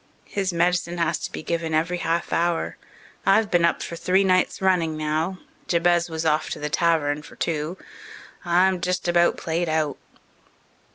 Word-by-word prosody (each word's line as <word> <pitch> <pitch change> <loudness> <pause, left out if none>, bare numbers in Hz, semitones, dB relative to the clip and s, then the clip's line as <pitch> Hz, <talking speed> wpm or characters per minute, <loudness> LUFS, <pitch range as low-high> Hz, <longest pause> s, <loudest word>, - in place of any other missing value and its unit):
His 195 -2 -2
medicine 175 0 0
has 170 -1 0
to - - -5
be - - -6
given 165 -1 -2
every 170 +3 0
half 165 +1 -1
hour. 170 0 0 0.5
I've 200 +2 +3
been 175 -2 +3
up 170 - +2
for 170 - -6
three 185 +3 +2
nights 185 -1 +2
running 175 -5 +1
now. 155 +4 -1 0.3
Jabez 175 0 +2
was 160 0 -4
off 155 0 +1
to - - -5
the 150 0 -4
tavern 155 -4 +1
for 150 - -14
two. 160 +2 -2 0.7
I'm 180 +1 +2
just 180 0 -1
about 175 0 +3
played 165 +1 -2
out." 155 -3 0
170 Hz, 165 wpm, -24 LUFS, 160-180 Hz, 0.7 s, I've